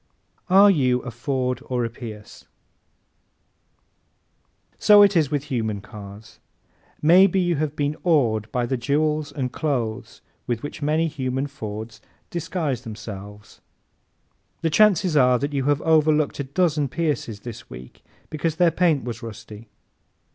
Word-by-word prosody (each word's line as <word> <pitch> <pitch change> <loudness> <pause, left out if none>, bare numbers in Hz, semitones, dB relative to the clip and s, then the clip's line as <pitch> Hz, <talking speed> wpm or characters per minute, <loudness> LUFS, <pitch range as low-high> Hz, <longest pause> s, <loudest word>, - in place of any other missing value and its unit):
Are 200 +2 +7
You 125 -7 +1
a 125 - -6
Ford 125 0 -2
or 125 -2 -1
a - - -3
Pierce? 110 -3 -10 2.3
¶ - - -34
So 205 -1 +8
it 200 -1 +4
is 155 -5 +3
with 145 -2 -1
human 110 -4 -1
cars. 105 0 -12 0.6
Maybe 185 +4 +6
you 175 -3 +1
have 150 0 -2
been 145 +1 -1
awed 115 - +1
by 125 -1 0
the 130 +2 -2
jewels 150 +4 0
and 130 -3 -3
clothes 125 -8 -3 0.3
with 120 -2 -2
which 145 - -7
many 155 +3 +1
human 130 -2 -3
Fords 110 -5 -7 0.3
disguise 165 -7 -2
themselves. 105 -3 -10 1.0
The 165 - 0
chances 190 -2 +4
are 125 -3 +5
that 140 +4 -3
you 135 -2 -1
have 145 0 +1
overlooked 155 -2 +2
a 140 - -2
dozen 150 0 0
Pierces 135 -9 -2
this 120 -1 -9
week 65 0 -12 0.3
because 155 +1 -2
their 170 0 +3
paint 165 -4 +2
was 120 -2 -6
rusty. 110 -1 -10
140 Hz, 140 wpm, -23 LUFS, 115-155 Hz, 2.3 s, So